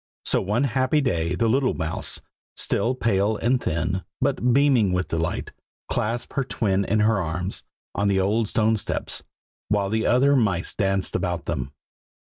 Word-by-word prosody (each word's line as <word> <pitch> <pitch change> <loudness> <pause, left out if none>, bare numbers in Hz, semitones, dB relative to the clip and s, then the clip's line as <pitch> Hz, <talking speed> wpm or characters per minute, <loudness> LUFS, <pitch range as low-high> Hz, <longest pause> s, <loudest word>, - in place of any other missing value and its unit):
So - - +3
one 105 +7 0
happy 130 +3 +2
day 85 - 0
the 115 +5 +1
little 130 +3 +2
mouse, 80 -1 -1 0.4
still 125 +3 +1
pale 105 -3 +1
and 125 +2 +1
thin, 85 +4 -1 0.2
but 125 +1 +1
beaming 125 -7 +4
with 90 0 -1
delight, 80 -1 -2 0.4
clasped 115 +3 -2
her 140 - 0
twin 100 -6 0
in 105 +2 +1
her 105 -2 +3
arms, 90 +3 -2 0.3
on 100 +2 0
the 100 -1 +2
old 105 +4 +1
stone 110 +1 +2
steps, - - -2 0.5
while 100 -1 0
the 110 0 +1
other 135 +3 +4
mice 100 -9 +1
danced 95 -1 -1
about 90 -2 -2
them. 70 -3 -3
105 Hz, 160 wpm, -24 LUFS, 90-120 Hz, 0.5 s, beaming